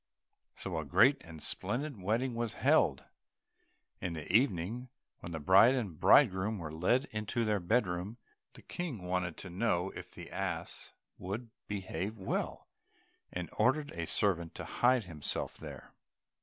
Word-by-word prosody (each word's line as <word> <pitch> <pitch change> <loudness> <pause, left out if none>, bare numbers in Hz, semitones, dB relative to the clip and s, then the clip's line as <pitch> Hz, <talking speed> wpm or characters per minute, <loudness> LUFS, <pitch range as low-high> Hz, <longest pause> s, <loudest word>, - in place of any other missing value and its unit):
So 90 -4 -3
a - - -3
great 105 - +5
and 80 -2 -10
splendid 120 +3 -3
wedding 115 +7 0
was 115 -1 -2
held. - - +3 1.0
In 90 - -3
the 80 -2 -6
evening, 115 +1 +1 0.3
when 85 - -7
the 80 - -3
bride 95 - +7
and 100 - -3
bridegroom 105 -4 +5
were 80 -4 -5
led 105 - +2
into 110 +2 -1
their 105 -1 +2
bed 110 +7 +2
room, 90 +5 -4 0.4
the - - -14
King 150 - -5
wanted 90 -2 -1
to 90 - -8
know 95 -1 0
if - - -9
the - - -10
ass - - -3 0.3
would 110 +5 -5 0.2
behave 100 +1 -3
well, 95 - -3 0.6
and 90 -1 -4
ordered 145 +3 +2
a 85 -1 -4
servant 85 -5 0
to - - -5
hide 125 -1 +3
himself 80 -6 -4
there. - - -10
100 Hz, 150 wpm, -33 LUFS, 90-120 Hz, 1.0 s, bride